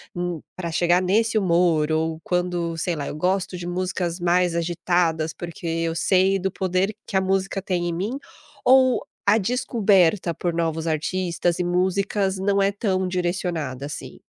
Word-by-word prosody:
hum, 175 -3 -3
pra 170 -3 -4
chegar 175 +2 +3
nesse 220 +4 +2
humor", 170 -5 +2
ou 160 0 0
quando, 175 -2 -1
sei 170 +1 -1
lá, 145 -2 -4
"eu - - -5
gosto 185 +3 -1
de 175 0 -6
músicas 180 -1 -2
mais 175 0 +2
agitadas 165 -1 0
porque 170 0 -8
eu 165 0 -1
sei 190 +3 +3
do 190 +1 -1
poder 190 +3 -1
que 195 - -1
a 190 - +3
música 195 +1 0
tem 180 -2 -1
em 170 - -2
mim", 205 +10 -2 0.5
ou 260 0 +5 0.2
a 205 +2 +5
descoberta 205 -6 +2
por 175 +2 -2
novos 165 -1 -1
artistas 170 +2 -1
e - - +1
músicas 190 +2 0
não 200 +1 +1
é 195 0 +3
tão 190 -3 -1
direcionada, 175 -7 -2
assim? 145 - -8
180 Hz, 165 wpm, -23 LUFS, 170-190 Hz, 0.5 s, ou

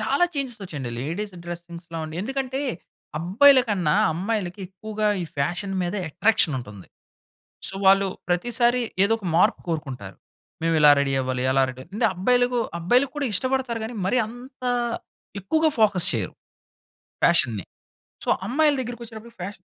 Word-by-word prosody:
చాలా 270 +10 +2
చేంజెసొచ్చాయండి. 195 - -4
లేడీస్ 185 +8 -4
డ్రసింగ్స్‌లో 170 -1 -7
అండి. 155 +1 -7
ఎందుకంటే, 265 +2 -3 0.6
అబ్బాయిల 250 - +6
కన్నా 180 -7 +1 0.2
అమ్మాయిలకి 195 +1 -3
ఎక్కువగా 215 +2 -2
ఈ - - -3
ఫ్యాషన్ 175 +7 -1
మీద 175 +3 -2
ఎట్రాక్షనుంటుంది. 150 - 0 0.8
సో, - - -8
వాళ్ళు 195 0 +6 0.2
ప్రతిసారి 240 +7 +2 0.2
ఏదొక 225 0 0
మార్పు 175 - +3
కోరుకుంటారు. 130 - -4 0.5
మేవిలా 155 -3 +5
రెడీ 140 -1 +1
అవ్వాలి 130 -1 -2
అలా 135 0 +4
రెడీ 130 +1 -10
అంటే, 215 - +2
అబ్బాయిలకు 245 +6 +2 0.2
అబ్బాయిలుకు 250 +10 +2
కూడా 285 -3 0
ఇష్టపడతారు 255 -1 0
గానీ, 230 +1 -6
మరీ 250 +6 +2
అంత 255 +3 -11 0.8
ఎక్కువగా 315 - +2
ఫోకస్ 195 -4 +4
చెయ్యరు 105 -7 -2 0.9
ఫ్యాషన్ని. 110 -5 +4 0.6
సో, - - -2 0.2
అమ్మాయిల 295 +4 +3
దగ్గరికొచ్చేటప్పటికి 235 -1 -9
ఫ్యాషన్ 185 -1 -8
200 Hz, 125 wpm, -24 LUFS, 165-245 Hz, 0.9 s, అబ్బాయిల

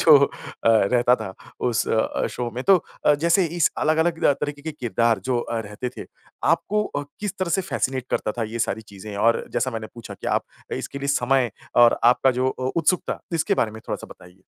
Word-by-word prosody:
जो 150 -3 +8
अ, - - -9 0.4
रहता 120 +3 +4
था 110 -5 -7 0.3
उस 120 0 0
अ, 110 - +1
शो 120 -1 -3
में 125 - -3
तो 195 - +7 0.3
अ, 150 - +7
जैसे 170 +5 +3
इस 170 - +4
अलग-अलग 160 +2 +1
रा - - +6
तरीके 145 0 -5
के 160 - -4
किरदार 115 -5 +1
जो 125 -2 +1
अ, 115 -1 -3
रहते 105 +3 -5
थे। - - -7 0.4
आपको 200 +6 +2
अ, 145 - -4 0.2
किस 210 -1 -3
तरह 185 -2 -1
से 190 - +2
फ़ैसिनेट 130 -5 -2
करता 105 - 0
था - - +1
ये 115 - -3
सारी 110 0 -1
चीज़ें 100 +1 -8
और 115 +3 +2
जैसा 130 - 0
मैंने 110 -2 -5
पूछा 115 -1 -9
कि - - -9
आप - - -2 0.3
इसके 140 - -6
लिए 140 0 -4
समय 130 -3 +2 0.3
और 120 - +6
आपका 135 +1 +2
जो 130 - +3
अ, 130 0 -3
उत्सुकता, 175 +2 +1 0.2
इसके 200 - +1
बारे 110 - +1
में 110 +1 -10
थोड़ा-सा - - -4
बताइए। 90 +1 -15
130 Hz, 210 wpm, -23 LUFS, 115-155 Hz, 0.4 s, जो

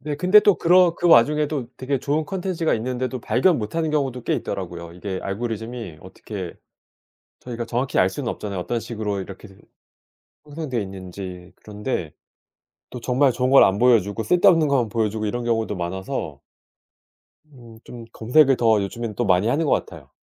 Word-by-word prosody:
네. 150 -1 -4
근데 185 +6 +6
또 205 -1 +4
그렇 175 0 +4
그 175 - 0
와중에도 150 0 +3
되게 130 +1 -2
좋은 150 +4 -1
콘텐츠가 180 -2 -1
있는데도 125 +2 -3
발견 130 +11 +2
못 105 +3 -5
하는 165 -1 0
경우도 135 -5 -1
꽤 - - 0
있더라고요. 85 -1 -5
이게 95 +2 -5
알고리즘이 110 -3 -5
어떻게 - - -8 0.9
저희가 120 -1 -6
정확히 120 +3 -2
알 95 - +5
수는 120 +5 -4
없잖아요 100 -3 -5
어떤 115 +6 -2
식으로 110 -3 -4
이렇게 95 +2 -9
된 95 -1 -19 0.9
형성돼 145 -5 -4
있는지. 95 -1 -9
그런데 105 - -5 0.8
또 125 - -8
정말 130 +2 +2
좋은 125 +2 0
걸 135 - +8
안 95 +1 +2
보여 120 -1 +5
주고 100 +3 -5
쓸데없는 175 - +4
것만 130 -5 +1
보여 110 0 0
주고 110 +1 -4
이런 120 +3 -3
경우도 115 -3 -1
많아서 90 +2 -5 1.1
음 115 -4 -15
좀 120 -2 -10
검색을 135 +4 +3
더 110 -3 +3
요즘엔 110 +2 -5
또 120 - -1
많이 95 +2 +3
하는 145 +7 +1
것 145 - 0
같아요. 75 -6 -3
120 Hz, 370 characters per minute, -22 LUFS, 100-140 Hz, 1.1 s, 걸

